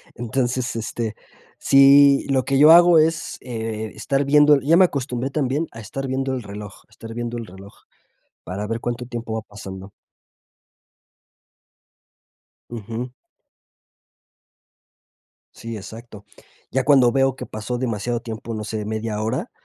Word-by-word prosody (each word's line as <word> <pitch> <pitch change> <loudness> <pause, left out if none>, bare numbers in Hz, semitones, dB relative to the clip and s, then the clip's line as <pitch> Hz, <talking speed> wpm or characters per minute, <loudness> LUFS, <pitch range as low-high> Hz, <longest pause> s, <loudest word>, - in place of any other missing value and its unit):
Entonces, 120 0 -2
este, 115 -1 -4 0.4
sí, 140 0 +6
lo 130 -2 +1
que 135 -1 +1
yo 150 +3 +8
hago 175 -1 +7
es, 160 +1 0
eh, 110 -3 -5
estar 140 0 -1
viendo 150 +1 +5
el 135 - -2
y - - -8
ya 165 - +6
me 190 - +7
acostumbré 130 -4 -3
también 145 +2 -1
a 115 - -10
estar 135 +6 -6
viendo 135 0 -2
el 125 - -3
reloj 105 0 -10
estar 115 0 -11
viendo 120 0 -4
el 115 - -6
reloj, 95 +2 -13 0.7
para 100 +4 -5
ver 115 +1 -3
cuánto 120 +1 -4
tiempo 115 -2 -6
va 110 - -2
pasando. 95 -1 -10 2.8
Ujú. 115 +2 -6 2.4
Sí, 115 -1 -8
exacto, 110 +1 -11 0.5
ya 130 0 0
cuando 130 -4 +5
veo 135 0 +2
que - - -7
pasó 110 +3 -5
demasiado 120 -1 -2
tiempo, 115 0 -7
no 110 -1 -4
sé, 105 -1 -4
media 110 0 -3
hora, 110 +1 -3
120 Hz, 140 wpm, -22 LUFS, 110-135 Hz, 2.8 s, yo